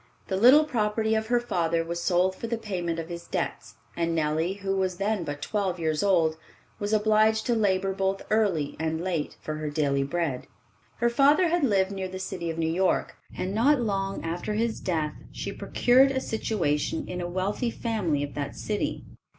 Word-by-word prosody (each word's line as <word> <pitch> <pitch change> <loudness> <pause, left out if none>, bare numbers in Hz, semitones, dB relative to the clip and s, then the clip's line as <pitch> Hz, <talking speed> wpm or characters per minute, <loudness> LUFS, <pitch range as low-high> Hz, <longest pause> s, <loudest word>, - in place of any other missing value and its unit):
The 190 - 0
little 250 +10 +7
property 220 -5 0
of 220 0 0
her 245 +1 +3
father 170 -8 0
was 170 +1 -4
sold 185 +1 +2
for 230 - -5
the 235 0 -1
payment 180 -6 -3
of 165 -1 -4
his 170 0 -7
debts, - - -3 0.2
and 170 -1 0
Nellie, 160 +3 0
who 195 -1 -2
was 185 -2 -1
then 200 -1 0
but 145 -2 -5
twelve 195 -4 -1
years 160 -2 0
old, 170 -6 +3 0.4
was 205 0 -2
obliged 215 +1 +3
to 240 - +2
labor 195 -3 +1
both 195 0 -1
early 195 -10 +1
and 160 0 -1
late 175 -5 -2
for 155 0 -4
her 155 -1 -3
daily 145 -2 +1
bread. 145 -3 -2 0.5
Her 235 - +2
father 290 +8 +4
had 345 -1 +1
lived 195 -6 +2
near 190 -1 -3
the 185 - -6
city 185 -2 -4
of 165 - -4
New 160 0 0
York, 185 +2 +1 0.2
and 185 +1 -2
not 265 +7 +4
long 195 -5 -2
after 175 +5 -3
his 225 +1 0
death 155 -4 -1 0.2
she - - -5
procured 260 +3 +4
a 265 -1 0
situation 180 - -1
in 180 0 -4
a 175 - -3
wealthy 195 +6 -1
family 200 - -1
of 145 - -5
that 145 -1 -4
city. 210 -1 -3
190 Hz, 190 wpm, -27 LUFS, 165-220 Hz, 0.5 s, little